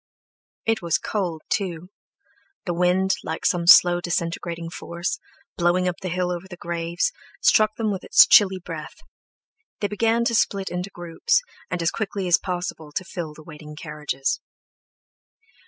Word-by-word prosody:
It 225 0 +1
was 170 -2 +1
cold, 175 -7 -3
too; 180 -3 -2 0.8
the 175 - -1
wind, 180 +2 +2
like 160 - -5
some 175 -2 +1
slow, 175 -1 +8
disintegrating 170 -1 -3
force, 170 +1 -4 0.4
blowing 175 +1 +2
up 180 - -1
the 185 - -3
hill 180 +1 -1
over 180 +1 -5
the 175 -2 -10
graves, 170 - -1 0.3
struck 215 -1 +4
them 220 -2 -1
with 190 - -4
its - - +7
chilly 190 -2 +6
breath; 165 -4 -8 0.8
they 205 - 0
began 225 +3 +1
to 235 - +1
split 200 -3 +1
into 180 +2 -3
groups, 175 - 0 0.3
and 175 -2 -2
as 165 - +2
quickly 200 -3 -3
as 175 - +5
possible 175 -4 -4
to 185 - -3
fill 165 -5 -6
the 155 - -13
waiting 150 -1 -11
carriages. 150 +1 -3
175 Hz, 155 wpm, -23 LUFS, 170-190 Hz, 0.8 s, slow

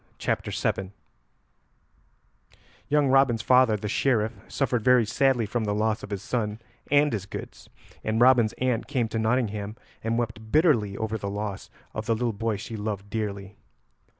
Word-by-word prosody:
CHAPTER - - -1
VII 95 0 -2 1.9
Young 145 -2 +3
Robin's 130 -4 +4
father, 125 -4 +5
the 105 - -5
Sheriff, 110 0 +1
suffered 125 -5 -1
very 125 -2 +5
sadly 125 +1 +2
from 110 +2 -2
the 105 0 0
loss 110 +1 0
of - - -8
his 100 -2 -4
son 110 -3 -2 0.3
and 145 -1 +4
his 100 -3 -3
goods, - - -9 0.3
and 110 +1 0
Robin's 120 -3 +5
aunt 125 -3 -1
came 125 -4 0
to 115 - -2
Nottingham 110 -3 -1 0.3
and 115 +1 0
wept 115 -2 -4
bitterly 125 - +3
over 110 0 -2
the 100 - -4
loss 100 -1 -5 0.2
of 110 0 -5
the 115 - +2
little 120 0 -1
boy 110 +1 -1
she 115 +2 -7
loved 105 -1 -4
dearly. 100 -2 -4
110 Hz, 160 wpm, -26 LUFS, 105-125 Hz, 1.9 s, father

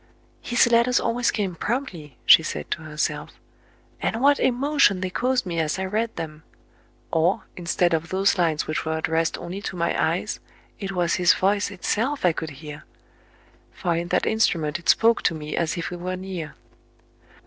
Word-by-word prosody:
" - - -36
His 240 - +5
letters 235 +1 +3
always 240 +1 0
came 195 -4 -1
promptly," 175 - -4
she - - +9
said 75 - -5
to - - -2
herself; 150 -1 -4 0.3
" - - -33
and 225 - -1
what 285 +2 +4
emotion 260 -5 +3
they 185 0 -2
caused 255 +4 0
me 170 -2 -2
as 155 +1 0
I 190 - -2
read 220 +4 -2
them! 155 -2 -6 0.7
Or, 165 +4 +2
instead 175 0 +1
of 165 +1 -1
those 195 +1 +2
lines 165 -5 +1
which 155 - -2
were 160 0 -2
addressed 160 +1 0
only 185 +3 -6
to 195 - -5
my 170 -1 0
eyes, - - -1 0.4
it 195 -1 -4
was 175 -2 +1
his 175 - +6
voice 200 +2 +1
itself 225 +7 -1
I 180 - +5
could 160 0 -5 0.2
hear; 150 0 -8 0.9
for 170 -1 -1
in 170 +1 -2
that - - +1
instrument 165 -8 +1
it 170 - -5
spoke 230 +1 +4
to 165 - +1
me 150 -1 -5
as 170 0 -1
if 170 - -3
he 180 - -6
were 180 +1 -4
near." 180 -6 -6
180 Hz, 185 wpm, -24 LUFS, 160-220 Hz, 0.9 s, she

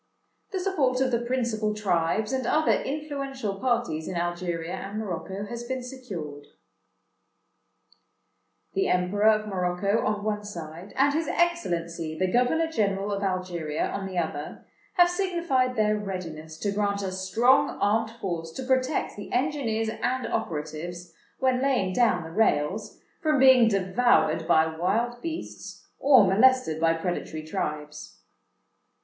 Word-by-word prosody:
"The 385 - -2
support 300 -10 +1
of 260 -1 +1
the 235 -1 +1
principal 235 -4 -1
tribes, 210 +2 0
and 260 -1 -1
other 310 +1 +3
influential 275 -8 -3
parties 240 -11 0
in 185 - -4
Algeria 175 -1 -2
and 200 +2 -5
Morocco, 195 -1 -4
has 235 +3 -6
been 255 +1 -4
secured. 190 - -7 2.3
"The 390 0 +1
Emperor 185 +4 +2
of 215 -1 +2
Morocco, 190 +2 0
on 210 -1 -1
one 210 -1 -1
side, 170 -1 -8
and 280 +1 +3
his 320 0 0
Excellency 170 - -1
the 185 +1 0
Governor 250 +7 +3
General 205 -9 -1
of 200 -1 -2
Algeria, 180 -5 -2
on 195 -1 -4
the 185 -1 -6
other, 160 -3 -3 0.3
have 350 -2 +6
signified 340 -9 0
their 215 -1 +2
readiness 165 -6 -6
to 205 - 0
grant 200 0 0
a 190 - -2
strong 225 +8 +2
armed 220 +2 +2
force 180 -8 -4
to 260 - -5
protect 260 +2 0
the 205 - -8
engineers 245 -5 0
and 255 0 0
operatives, 170 -1 -4 0.2
when 255 -1 +1
laying 250 -9 +1
down 220 -6 +3
the 160 - -9
rails, 205 +1 0 0.2
from 310 -2 +2
being 260 -3 +7
devoured 190 -5 +2
by 160 -2 +5
wild 215 +10 -1
beasts, 330 0 -7
or 265 -7 +6
molested 195 -4 +3
by 165 0 +4
predatory 165 -2 -4
tribes. 150 - -5
210 Hz, 140 wpm, -26 LUFS, 175-255 Hz, 2.3 s, being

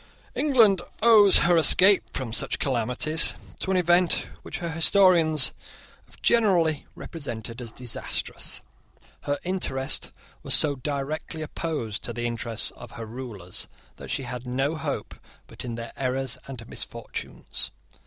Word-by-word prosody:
England 230 - +3 0.2
owes 215 -4 +9
her 175 0 +4
escape 185 +5 +7
from 120 -4 -5
such - - 0
calamities 135 +5 +1 0.2
to - - -2
an 190 - +2
event 175 0 +2 0.2
which - - -7
her 170 -1 -4
historians 165 -4 +4 0.6
have - - -18
generally 180 -10 +2
represented 120 -6 -7
as 115 -2 -8
disastrous. 120 -1 -4 0.6
Her 145 0 -1
interest 155 -8 -1 0.3
was - - +4
so 150 -2 +4
directly 145 +4 -4
opposed 150 -9 -4
to 120 - -4
the 120 0 -4
interests 115 -1 -3
of - - -13
her 115 - -7
rulers 110 -6 -6 0.3
that - - -11
she 135 - -3
had 125 0 -7
no 135 +4 -1
hope 155 - -5 0.3
but - - -11
in 120 -2 -5
their 115 0 -8
errors 130 -2 -2
and 125 -4 -9
misfortunes. - - -5
140 Hz, 135 wpm, -25 LUFS, 120-170 Hz, 0.6 s, owes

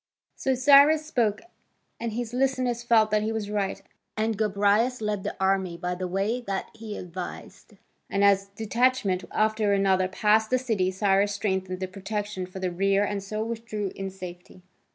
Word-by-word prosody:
So 265 -1 0
Cyrus 285 +4 +6
spoke, 230 -8 0 0.6
and 230 -1 -3
his 240 0 -4
listeners 255 -2 0
felt 225 -3 +3
that 215 0 +3
he 215 +1 -1
was 215 -2 -3
right, 200 -2 -2 0.3
and 220 +1 0
Gobryas 210 +4 +2
led 210 -2 -2
the - - -4
army 190 -2 +1
by 180 +1 -3
the 180 +1 -4
way 200 +7 -1
that 195 -1 -3
he 220 -2 -7
advised. 180 0 -8 0.4
And 200 0 +1
as 200 -1 +4
one 200 - -29
detachment 220 -4 +1
after 215 -1 +1
another 190 -1 +2
passed 215 +3 +2
the 255 - +3
city, 220 -8 0
Cyrus 195 +1 +2
strengthened 190 -2 -2
the 185 - -1
protection 200 0 -4
for 185 - -10
the 185 -1 -2
rear 195 +3 +2
and 205 -1 -2
so 215 +2 -3
withdrew 220 -4 -4
in 195 0 -4
safety. 180 -1 -10
205 Hz, 175 wpm, -26 LUFS, 190-225 Hz, 0.6 s, Cyrus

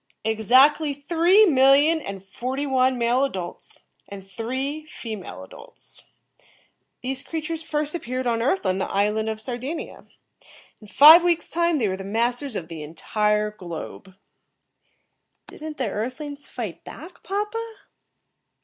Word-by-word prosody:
"Exactly 260 +7 +4
three 340 +8 +4
million 285 +1 +5
and 195 -5 -7
forty 255 +8 -4
one 260 -1 +2
male 240 +2 +2
adults 185 -10 -5 0.3
and 195 -1 -10
three 260 +9 -4
female 210 - -8
adults. - - -13 1.0
These 260 +1 -3
creatures 320 +1 -5
first 300 -1 -2
appeared 255 -6 -4
on 230 -1 0
Earth 280 - 0
on 185 0 0
the - - -2
island 210 +2 0
of 220 0 -4
Sardinia. 255 +7 -6 0.7
In 210 - -13
five 310 - +9
weeks' 345 -1 0
time 340 -1 +1
they 230 -6 +1
were 190 -1 -2
the 195 - -7
masters 240 +5 -1
of 165 - -4
the 165 -2 -8
entire 210 +7 -1
globe." 185 0 -9 1.3
"Didn't 310 -1 -9
the 255 - -1
Earth 235 +8 -4
lings 290 -1 -8
fight 220 -8 -6
back, 345 +4 -12
papa?" 440 +3 -4
255 Hz, 135 wpm, -23 LUFS, 210-305 Hz, 1.3 s, five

